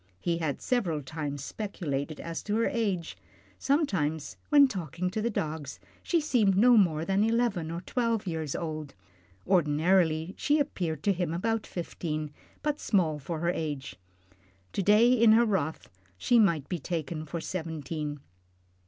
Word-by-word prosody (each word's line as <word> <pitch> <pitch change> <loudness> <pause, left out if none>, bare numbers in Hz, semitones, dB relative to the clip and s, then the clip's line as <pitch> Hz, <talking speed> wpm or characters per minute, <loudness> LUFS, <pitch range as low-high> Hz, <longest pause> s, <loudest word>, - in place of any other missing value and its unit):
He 170 -1 -1
had 155 -5 -2
several 175 - 0
times 145 -1 -5
speculated 155 -7 -4
as 165 -1 -5
to 210 - -2
her 230 - +2
age. 195 -8 -1 0.4
Sometimes 175 - 0
when 285 -2 +7
talking 180 - -3
to 215 +2 -2
the 235 - 0
dogs 155 -8 -4 0.2
she 340 - +1
seemed 225 -11 +2
no 245 +4 +6
more 165 -7 +3
than 195 +3 +2
eleven 225 -7 +1
or 170 +1 -4
twelve 230 +1 -1
years 160 -5 -3
old. 155 -5 -5 0.5
Ordinarily 165 0 +2
she 295 - +3
appeared 175 - -2
to 200 - +3
him 175 -3 -2
about 225 +4 -1
fifteen, 155 -3 -4 0.3
but 300 0 -1
small 165 -8 +1
for 160 +3 -5
the 170 +1 +1
age. 140 - -4 0.8
To - - 0
day 215 +5 +5
in 230 -3 +6
her 235 +2 +5
wrath, 175 -8 -1 0.3
she 240 - +3
might 170 -9 +3
be 180 - -3
taken 160 0 -3
for 170 +3 -4
seventeen. 155 -4 -4
175 Hz, 155 wpm, -29 LUFS, 155-215 Hz, 0.8 s, when